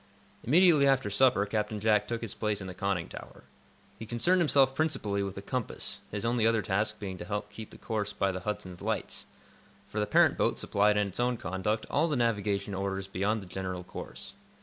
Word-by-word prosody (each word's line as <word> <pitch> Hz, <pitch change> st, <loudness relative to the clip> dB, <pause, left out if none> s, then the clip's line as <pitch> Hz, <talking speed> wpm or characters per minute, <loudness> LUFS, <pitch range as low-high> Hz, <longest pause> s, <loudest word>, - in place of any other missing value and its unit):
Immediately 155 Hz, 0 st, +5 dB
after 130 Hz, -6 st, +2 dB
supper 120 Hz, -2 st, +4 dB
Captain 105 Hz, 0 st, -2 dB
Jack 105 Hz, -1 st, +3 dB
took 115 Hz, 0 st, -3 dB
his 115 Hz, -4 st, -5 dB
place 105 Hz, -2 st, -1 dB
in 95 Hz, -, -6 dB
the 95 Hz, -, -6 dB
conning 95 Hz, -2 st, -1 dB
tower. -, -, -11 dB, 0.6 s
He 110 Hz, -, -7 dB
concerned 145 Hz, +12 st, +2 dB
himself 140 Hz, -4 st, +4 dB
principally 135 Hz, -10 st, 0 dB
with 100 Hz, -1 st, -3 dB
the 100 Hz, -, -7 dB
compass, 125 Hz, +1 st, -4 dB
his 105 Hz, +1 st, -4 dB
only 115 Hz, -1 st, +2 dB
other 115 Hz, -2 st, +2 dB
task 105 Hz, +3 st, 0 dB
being 95 Hz, -3 st, -5 dB
to 105 Hz, +4 st, -3 dB
keep 110 Hz, +1 st, -9 dB
the -, -, -13 dB
course 105 Hz, -3 st, -2 dB
by 100 Hz, -1 st, 0 dB
the 95 Hz, -, -4 dB
"Hudson's" 90 Hz, -2 st, -5 dB
lights, -, -, -3 dB, 0.6 s
for 100 Hz, +1 st, -4 dB
the 105 Hz, -, 0 dB
parent 105 Hz, -, +4 dB
boat -, -, +2 dB
supplied 105 Hz, +1 st, +2 dB
in 105 Hz, -, +3 dB
its 95 Hz, -, -8 dB
own 125 Hz, 0 st, +1 dB
conduct 95 Hz, +4 st, -2 dB
all 155 Hz, +4 st, +3 dB
the 150 Hz, -, 0 dB
navigation 105 Hz, -4 st, 0 dB
orders 95 Hz, 0 st, -2 dB
beyond 100 Hz, +3 st, -1 dB
the -, -, -10 dB
general 95 Hz, 0 st, -5 dB
course. -, -, -9 dB
105 Hz, 200 wpm, -30 LUFS, 100-115 Hz, 0.6 s, Immediately